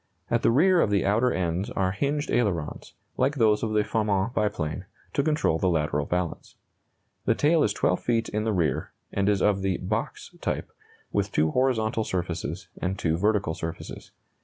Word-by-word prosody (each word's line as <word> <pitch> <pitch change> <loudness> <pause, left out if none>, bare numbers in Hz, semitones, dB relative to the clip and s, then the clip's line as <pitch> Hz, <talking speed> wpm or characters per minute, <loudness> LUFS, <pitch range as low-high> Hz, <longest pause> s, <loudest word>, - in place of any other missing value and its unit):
At 120 0 +2
the - - +4
rear 170 +8 +5
of - - +2
the 100 -1 +2
outer 115 +6 +3
ends 90 +1 -1
are 95 -1 0
hinged 145 +9 -1
ailerons, 90 -11 -1 0.2
like 135 +3 +2
those 110 -5 +3
of 110 - -1
the 105 -1 +3
Farman 105 0 0
biplane, 95 - -1 0.3
to - - +2
control 150 - +1
the 95 - +2
lateral 75 -3 0
balance. 90 -1 -3 0.7
The 115 - +3
tail 155 +5 +3
is 105 - +3
12 90 -3 +1
feet 115 -1 0
in 105 0 -2
the 110 - 0
rear, 85 -9 0 0.2
and 100 0 +1
is 100 -2 +2
of 100 -2 +3
the 95 -2 0
"box" - - -3
type, - - -2 0.4
with - - 0
two 80 +1 +2
horizontal 115 -3 +1
surfaces 90 -3 -3
and 95 +2 -1
two 80 -3 0
vertical 100 -2 +1
surfaces. 80 0 -7
105 Hz, 180 wpm, -26 LUFS, 90-115 Hz, 0.7 s, rear